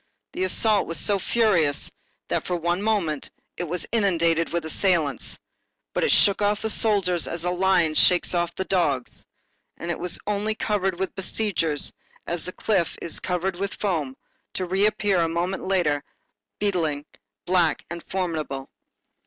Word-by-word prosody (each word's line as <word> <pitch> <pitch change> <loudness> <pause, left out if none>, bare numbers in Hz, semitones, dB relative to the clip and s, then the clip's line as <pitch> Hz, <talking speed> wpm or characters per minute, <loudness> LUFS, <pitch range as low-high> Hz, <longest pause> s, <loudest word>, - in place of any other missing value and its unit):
The 370 +1 0
assault 220 - +3
was 165 -3 -1
so 200 +4 +2
furious, 185 -10 +2 0.4
that - - -2
for 180 - 0
one 175 +2 0
moment, 195 -9 0 0.3
it 175 - -3
was 175 +2 -2
inundated 170 -6 +2
with 170 -1 -1
assailants; 160 - +1 0.6
but - - 0
it - - +2
shook 200 0 +5
off 205 0 +1
the 220 - +1
soldiers 190 -7 +2
as 170 0 -4
the 180 - 0
lion 180 -3 +3
shakes 180 +3 +4
off 175 -1 0
the 190 - -3
dogs, 145 -10 0 0.5
and 170 - -3
it - - -3
was 180 -1 -1
only 210 +1 0
covered 195 -4 0
with 190 0 -2
besiegers 185 -6 0 0.3
as 170 -1 -3
the 185 - -4
cliff 185 -4 0
is 170 - -1
covered 180 0 -2
with 200 +1 -3
foam, 155 -10 -2 0.4
to 185 - -1
reappear, 200 +1 +2
a 165 -1 +2
moment 175 +4 -2
later, 165 -7 +1 0.5
beetling, 165 -8 0 0.4
black 175 -3 +2
and 170 -1 -5
formidable. 155 -7 -3
180 Hz, 155 wpm, -24 LUFS, 165-200 Hz, 0.6 s, shook